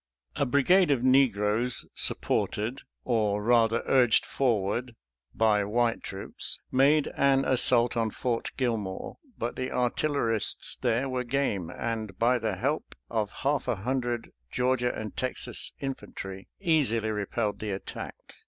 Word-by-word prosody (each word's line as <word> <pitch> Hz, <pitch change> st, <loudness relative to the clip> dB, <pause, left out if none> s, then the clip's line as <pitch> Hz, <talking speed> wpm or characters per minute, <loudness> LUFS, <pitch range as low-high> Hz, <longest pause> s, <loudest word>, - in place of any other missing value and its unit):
A 140 Hz, -, 0 dB
brigade 170 Hz, +8 st, +4 dB
of 135 Hz, -4 st, +2 dB
negroes, 120 Hz, -3 st, +3 dB
supported 115 Hz, +6 st, 0 dB
— -, -, -54 dB
or, 105 Hz, -4 st, +1 dB
rather, 115 Hz, -1 st, +3 dB
urged 125 Hz, -4 st, +4 dB
forward 120 Hz, -1 st, 0 dB, 0.2 s
— -, -, -32 dB
^by 105 Hz, -2 st, +3 dB
white 120 Hz, +1 st, +1 dB
troops, 95 Hz, 0 st, -3 dB
made 140 Hz, +3 st, +4 dB
an 135 Hz, -1 st, +3 dB
as 130 Hz, -2 st, +3 dB
sault 120 Hz, -1 st, +4 dB
on 115 Hz, -1 st, +1 dB
Fort 115 Hz, +2 st, -2 dB
Gilmore, 110 Hz, -7 st, -2 dB, 0.2 s
but 120 Hz, -, -3 dB
the 130 Hz, 0 st, -3 dB
artillerists 125 Hz, -2 st, 0 dB
there 125 Hz, +2 st, 0 dB
were 130 Hz, -1 st, -2 dB
game, 120 Hz, -9 st, -1 dB
and, 110 Hz, -4 st, -4 dB
by 120 Hz, +3 st, +3 dB
the 110 Hz, -3 st, -1 dB
help 140 Hz, -, -2 dB, 0.2 s
of 110 Hz, -3 st, 0 dB
half 145 Hz, +2 st, -1 dB
a -, -, +1 dB
hundred 120 Hz, +2 st, -2 dB, 0.2 s
Georgia 125 Hz, -, +1 dB
and 110 Hz, -1 st, -6 dB
Texas 130 Hz, 0 st, -3 dB
infantry, 95 Hz, -8 st, -6 dB
easily 140 Hz, -, +1 dB
repelled 105 Hz, +1 st, -2 dB
the 110 Hz, -, -4 dB
attack. 95 Hz, -1 st, -6 dB
120 Hz, 140 wpm, -28 LUFS, 110-130 Hz, 0.2 s, brigade